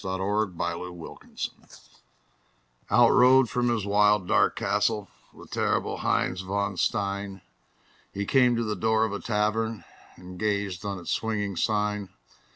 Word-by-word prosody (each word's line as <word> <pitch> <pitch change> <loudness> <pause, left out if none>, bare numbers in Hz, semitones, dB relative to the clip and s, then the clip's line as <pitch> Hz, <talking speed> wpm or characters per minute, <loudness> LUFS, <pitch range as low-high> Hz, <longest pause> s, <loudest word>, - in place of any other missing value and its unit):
_ - - -15
THE - - -5
LEGEND 95 0 -1
OF 85 0 -5
HEINZ - - -5
VON - - -12
STEIN - - -19 0.9
Out 120 -1 +5
rode 125 -1 +5
from 120 0 +1
his 115 -4 -1
wild, 105 -1 +3
dark - - +3
castle 100 0 0 0.2
The - - -14
terrible - - -1
Heinz 90 0 0
von 100 +1 -2
Stein; 100 0 -2 0.7
He 100 +1 -4
came 125 +1 +4
to 115 - 0
the 105 -1 -2
door 110 +3 +2
of 105 - -4
a 100 - -3
tavern 110 0 -1 0.3
And 90 0 -11
gazed 100 -3 -1
on 100 -1 -3
its 90 - -6
swinging 105 -3 -2
sign. 105 0 -1
100 Hz, 160 wpm, -26 LUFS, 95-110 Hz, 0.9 s, Out